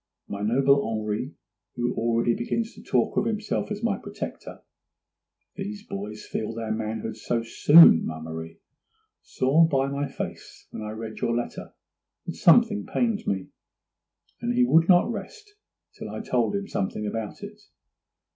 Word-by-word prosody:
My 100 - -5
noble 135 +6 +3
Henri, 110 +4 -3 0.4
who 120 0 -1
already 115 +1 +1
begins 225 - -2
to - - -13
talk - - 0
of - - +2
himself 215 -1 -2
as 210 +1 -5
my 220 -4 0
protector - - -8 0.9
(these 205 +1 -6
boys 105 +2 -7
feel 110 +1 -4
their 115 -1 -4
manhood 110 0 -3
so 115 +1 -2
soon, 145 - +7
ma 80 0 -4
Marie), 80 +1 -7 0.6
saw 140 +6 +2
by 135 -3 +1
my 140 +1 -2
face - - -8
when - - -7
I 105 - -5
read 110 0 -7
your 115 0 0
letter 120 - -6 0.5
that - - -4
something 210 +4 +4
pained 230 -3 -1
me, 95 -1 -2 0.9
and 240 +1 -1
he 250 0 +4
would 165 -7 +4
not 180 +5 +5
rest 420 - -8 0.4
till - - -8
I - - -5
told - - 0
him 200 0 -3
something 105 - -3
about 110 0 -5
it. - - -9
120 Hz, 155 wpm, -25 LUFS, -, 0.9 s, soon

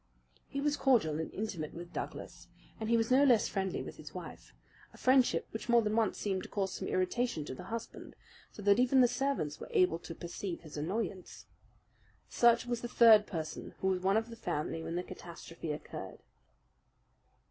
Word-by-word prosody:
He 275 - -4
was 295 0 +1
cordial 205 - +3
and 160 - -4
intimate 190 -8 -4
with 170 0 -9
Douglas, - - -6 0.3
and 220 0 -3
he 235 - +4
was 225 +1 0
no 265 +2 +6
less 245 -6 +5
friendly 190 -2 -2
with - - -9
his - - -11
wife - - -9 0.4
a - - -15
friendship 255 -1 +3
which 220 +2 -6
more 235 -1 +5
than 210 0 0
once 225 -3 +1
seemed 190 -2 -1
to - - -9
cause 195 -2 -1
some - - -4
irritation 185 -2 0
to 130 - -5
the - - -9
husband, 230 0 -7 0.4
so 205 - -10
that 200 +2 +5
even 255 +1 +5
the 245 - +6
servants 245 - -1
were - - -8
able 175 -2 +3
to 165 - -8
perceive 175 +2 -5
his 155 -3 -11
annoyance. 185 +4 -4 0.8
Such 235 0 +4
was 240 -1 -2
the 240 - -3
third 225 -3 +7
person 160 -4 -5
who 190 - +1
was 185 -1 0
one 195 +3 +3
of 225 +1 -2
the - - -7
family 160 -6 -3
when 165 - -4
the 180 - -1
catastrophe 165 -2 -8
occurred. 150 - -7
205 Hz, 190 wpm, -32 LUFS, 170-235 Hz, 0.8 s, third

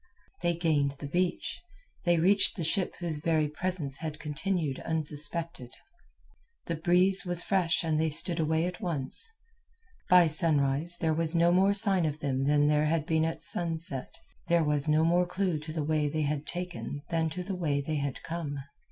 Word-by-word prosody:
They 170 0 0
gained 150 -5 0
the 145 - -8
beach; 180 - -2 0.4
they 175 -1 +3
reached 195 +5 +3
the 175 - -4
ship 180 +4 0
whose 165 -4 -4
very 155 -1 +1
presence 150 -3 -2
had 155 -2 -5
continued 155 -1 -3
unsuspected. 155 -3 -3 0.9
The 170 - -3
breeze 180 +4 +3
was 175 -1 0
fresh 180 -4 +1
and 155 -1 0
they 160 - +1
stood 165 +3 +2
away 160 +1 0
at 180 0 -6
once. 165 - -2 0.8
By 180 -1 +7
sunrise 155 0 +4
there 160 -2 +1
was 165 +1 +3
no 170 +1 +4
more 195 +3 +3
sign 195 -5 +3
of 150 -1 -4
them 135 -3 -2
than 145 +1 +3
there 150 0 +2
had 155 -1 0
been 160 -1 +1
at 165 - -4
sunset, 165 -6 0 0.3
there 170 -1 +2
was 150 0 0
no 155 +1 +3
more 175 +2 +2
clue 180 -3 -2
to 155 +1 -8
the 155 -1 -3
way 150 -1 0
they 155 +1 -2
had 145 0 -3
taken 175 -5 -6
than 165 -1 0
to 180 +3 -6
the 195 - -5
way 150 -6 -1
they 150 +2 -3
had 140 -2 -4
come. 160 -4 -5
160 Hz, 180 wpm, -28 LUFS, 150-175 Hz, 0.9 s, By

